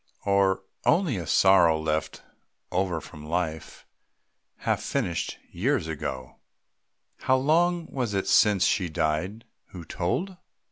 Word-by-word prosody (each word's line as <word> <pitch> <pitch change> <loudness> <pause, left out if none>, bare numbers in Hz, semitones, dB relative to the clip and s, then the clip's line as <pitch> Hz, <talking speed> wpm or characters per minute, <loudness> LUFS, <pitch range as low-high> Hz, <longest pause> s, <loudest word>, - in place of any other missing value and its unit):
Or 100 -1 +2 0.2
only 160 - +2
a 85 -3 -5
sorrow 90 -5 +5
left 80 0 -2 0.5
over 90 -2 0
from 75 +1 -12
life, 80 0 -4 0.7
Half - - -1
finished 85 -2 -2
years 115 - 0
ago? 65 -5 -5 0.8
How 130 - +2
long 170 +5 +2
was 120 -9 -3
it 95 - 0
since 105 -4 +4
she 90 -4 +1
died 80 +8 -2 0.2
who 90 -3 -10
told? 175 - -2
95 Hz, 120 wpm, -26 LUFS, 80-115 Hz, 0.8 s, sorrow